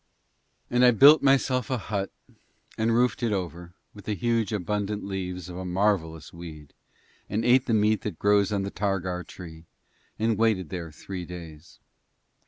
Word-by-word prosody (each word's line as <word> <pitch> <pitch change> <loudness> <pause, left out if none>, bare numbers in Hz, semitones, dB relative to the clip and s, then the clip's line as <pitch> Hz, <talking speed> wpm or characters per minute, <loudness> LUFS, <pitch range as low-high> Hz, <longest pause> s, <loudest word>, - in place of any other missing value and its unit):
And 125 +1 +3
I 125 - +8
built 140 +6 +7
myself 130 -3 +2
a 130 - 0
hut 100 -2 -3 0.7
and 110 +1 +1
roofed 125 +1 +2
it 115 -2 0
over 90 -2 -4 0.2
with 105 - -13
the 105 - -2
huge 115 +1 0
abundant 105 +1 -2
leaves 90 -2 -5
of 90 -1 -8
a 95 - -5
marvellous 90 -4 -1
weed 80 -4 -10 0.6
and 110 +2 -1
ate 125 +2 +4
the 115 - +1
meat 105 -1 +2
that 80 - -5
grows 100 0 +3
on 100 -1 0
the 100 - -4
targar 95 -3 -2
tree 80 -2 -11 0.5
and 110 -1 0
waited 105 -7 +1
there 85 -3 -6
three 90 +4 -7
days. 85 -3 -11
100 Hz, 165 wpm, -26 LUFS, 90-110 Hz, 0.7 s, I